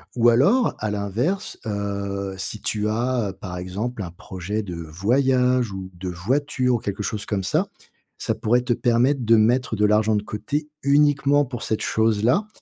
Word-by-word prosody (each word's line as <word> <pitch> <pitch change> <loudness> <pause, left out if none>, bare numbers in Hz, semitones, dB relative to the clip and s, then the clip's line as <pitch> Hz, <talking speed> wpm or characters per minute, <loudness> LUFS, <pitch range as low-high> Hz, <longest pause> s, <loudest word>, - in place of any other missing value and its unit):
Ou 120 -1 +5
alors 145 - +3
à 110 -1 -2
l'inverse, 115 - -2
heu, 100 -2 -3
si 105 +2 -5
tu 105 0 -1
as, 115 -2 0
par 90 -2 -6
exemple, 100 +6 -4
un 85 -3 -5
projet 95 +4 -5
de 90 -4 -6
voyage 125 - +1
ou 95 -1 -6
de 90 +1 -7
voiture 125 +8 0
ou - - +2
quelque 105 -2 -4
chose 105 -1 -3
comme 100 -3 -2
ça, - - +1 0.5
ça - - -1
pourrait 120 +3 +1
te 125 - -3
permettre 125 +3 +2
de 115 +1 +6
mettre 120 +2 +2
de 105 0 +2
l'argent 105 +1 +3
de 105 - 0
côté, 145 +9 -3
uniquement 145 0 +4
pour 120 -4 -6
cette 110 - -1
chose-là 115 - +2
110 Hz, 170 wpm, -23 LUFS, 100-125 Hz, 0.5 s, de